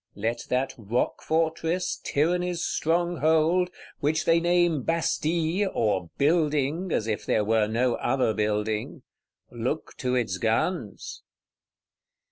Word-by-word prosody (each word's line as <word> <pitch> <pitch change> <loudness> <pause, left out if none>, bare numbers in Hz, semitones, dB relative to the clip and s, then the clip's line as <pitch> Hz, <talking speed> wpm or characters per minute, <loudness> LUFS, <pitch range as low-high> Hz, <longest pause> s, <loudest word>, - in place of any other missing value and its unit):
Let 115 +4 -3
that 130 +2 0
rock 115 +3 -1
fortress, 165 +2 -1
Tyranny's 175 +3 0
stronghold, 170 +1 +2 0.3
which 155 +2 0
they 165 0 +4
name 175 -3 +2
Bastille, 165 +4 0
or 95 -6 0
Building, 155 +2 +1
as 110 - 0
if 110 -2 -2
there 105 - +1
were 110 0 +2
no 120 +3 +1
other 130 -3 +1
building,—look 110 +5 -4
to 125 -1 -1
its 110 -7 -1
guns! 115 +11 -2
150 Hz, 105 wpm, -26 LUFS, 115-170 Hz, 0.3 s, they